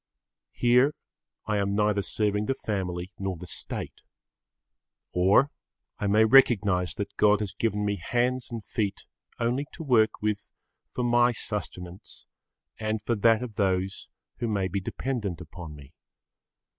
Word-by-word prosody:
Here 125 Hz, +5 st, +4 dB, 0.5 s
I 105 Hz, 0 st, 0 dB
am 100 Hz, 0 st, 0 dB
neither 105 Hz, -1 st, +2 dB
serving 105 Hz, +1 st, -1 dB
the 135 Hz, -, +1 dB
family 95 Hz, -6 st, -3 dB
nor 95 Hz, -2 st, -2 dB
the 90 Hz, -, -9 dB
State. 85 Hz, -, -5 dB, 1.1 s
Or 100 Hz, +10 st, +4 dB, 0.5 s
I 100 Hz, -, -1 dB
may 110 Hz, +2 st, +5 dB
recognise 100 Hz, -7 st, +4 dB
that 100 Hz, -1 st, -5 dB
God 105 Hz, -1 st, +5 dB
has 105 Hz, -3 st, -3 dB
given 105 Hz, -2 st, -1 dB
me 100 Hz, 0 st, 0 dB
hands 120 Hz, +7 st, 0 dB
and 115 Hz, -3 st, -6 dB
feet 100 Hz, -3 st, -2 dB, 0.3 s
only 125 Hz, +5 st, 0 dB
to 165 Hz, -, -7 dB
work 110 Hz, -6 st, +3 dB
with 105 Hz, -1 st, -2 dB, 0.4 s
for 125 Hz, -, -3 dB
my 120 Hz, 0 st, +4 dB
sustenance 95 Hz, -5 st, -6 dB, 0.5 s
and 110 Hz, 0 st, -1 dB
for 110 Hz, +3 st, -1 dB
that 115 Hz, +2 st, +3 dB
of 110 Hz, -5 st, -8 dB
those 95 Hz, -1 st, 0 dB, 0.3 s
who 120 Hz, -, -2 dB
may 100 Hz, -4 st, 0 dB
be 95 Hz, +2 st, -2 dB
dependent 105 Hz, -3 st, -3 dB
upon 85 Hz, -2 st, -9 dB
me. 70 Hz, +1 st, -14 dB
105 Hz, 145 wpm, -27 LUFS, 95-115 Hz, 1.1 s, may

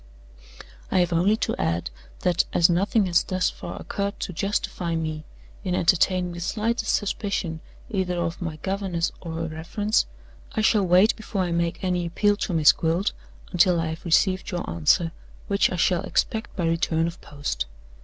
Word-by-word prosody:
"I -, -, +1 dB
have 175 Hz, -1 st, +2 dB
only 190 Hz, +6 st, +3 dB
to -, -, -1 dB
add 85 Hz, -5 st, -1 dB, 0.3 s
that, 175 Hz, -1 st, +2 dB
as 175 Hz, +1 st, +5 dB
nothing 200 Hz, +4 st, +2 dB
has 175 Hz, -2 st, +3 dB
thus 185 Hz, -1 st, 0 dB
far -, -, -8 dB
occurred 200 Hz, 0 st, -3 dB
to 185 Hz, -, -3 dB
justify 175 Hz, -2 st, -1 dB
me 155 Hz, -1 st, -3 dB, 0.4 s
in 180 Hz, -3 st, -1 dB
entertaining 180 Hz, +1 st, +2 dB
the 175 Hz, -, -7 dB
slightest 225 Hz, +6 st, 0 dB
suspicion 200 Hz, -5 st, -2 dB, 0.3 s
either 185 Hz, -4 st, -1 dB
of 170 Hz, 0 st, -2 dB
my 165 Hz, -3 st, -3 dB
governess 190 Hz, -3 st, -1 dB
or 165 Hz, -2 st, -6 dB
her 165 Hz, 0 st, -3 dB
reference, 170 Hz, +7 st, 0 dB, 0.5 s
I 220 Hz, -, 0 dB
shall 215 Hz, -2 st, +3 dB
wait 185 Hz, +5 st, +5 dB
before 215 Hz, -3 st, -3 dB
I 175 Hz, -, -2 dB
make 170 Hz, +1 st, -1 dB
any 180 Hz, -2 st, 0 dB
appeal 205 Hz, +4 st, +2 dB
to 195 Hz, -, -2 dB
Miss 155 Hz, -2 st, +7 dB
Gwilt 170 Hz, +4 st, 0 dB, 0.4 s
until 175 Hz, -1 st, +4 dB
I 165 Hz, -1 st, -1 dB
have 160 Hz, +1 st, -6 dB
received 185 Hz, +2 st, +2 dB
your 175 Hz, -1 st, -3 dB
answer 85 Hz, -, +2 dB, 0.4 s
which 200 Hz, 0 st, +2 dB
I -, -, -1 dB
shall 175 Hz, 0 st, +2 dB
expect 220 Hz, 0 st, -1 dB
by 175 Hz, -, -1 dB
return 165 Hz, 0 st, +1 dB
of 170 Hz, +2 st, -5 dB
post. 145 Hz, -, -4 dB
175 Hz, 175 wpm, -25 LUFS, 165-195 Hz, 0.5 s, Miss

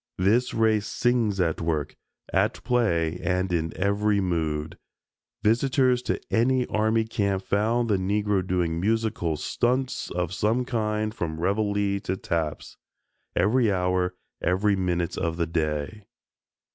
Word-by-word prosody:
This 110 Hz, +7 st, +2 dB
race 110 Hz, -2 st, +2 dB
sings 120 Hz, -5 st, +1 dB
at 85 Hz, -3 st, 0 dB
work, 80 Hz, -3 st, -1 dB, 0.4 s
at -, -, +1 dB
play 90 Hz, -9 st, +1 dB
and 95 Hz, 0 st, 0 dB
in 80 Hz, -1 st, 0 dB
every 100 Hz, +1 st, +1 dB
mood. 80 Hz, -4 st, -2 dB, 0.6 s
Visitors 125 Hz, +2 st, +3 dB
to -, -, -2 dB
any 125 Hz, +2 st, +2 dB
army 110 Hz, +1 st, +1 dB
camp 100 Hz, -3 st, -1 dB
found 115 Hz, +5 st, +1 dB
the 105 Hz, -3 st, +2 dB
Negro 100 Hz, +1 st, +1 dB
doing 85 Hz, -3 st, 0 dB
musical 105 Hz, -6 st, 0 dB
"stunts" 125 Hz, -, -1 dB
of 90 Hz, 0 st, -2 dB
some 110 Hz, +6 st, +1 dB
kind 110 Hz, -3 st, -1 dB
from 80 Hz, -6 st, -4 dB
reveille 100 Hz, +1 st, 0 dB
to 95 Hz, -1 st, -3 dB
taps 80 Hz, -5 st, -3 dB, 0.6 s
every 110 Hz, +2 st, +3 dB
hour, 90 Hz, -1 st, 0 dB, 0.3 s
every 100 Hz, +3 st, +2 dB
minute 90 Hz, -2 st, -1 dB
of 85 Hz, 0 st, -1 dB
the 85 Hz, -, +1 dB
day. 80 Hz, +5 st, -2 dB
100 Hz, 130 wpm, -26 LUFS, 85-110 Hz, 0.6 s, Visitors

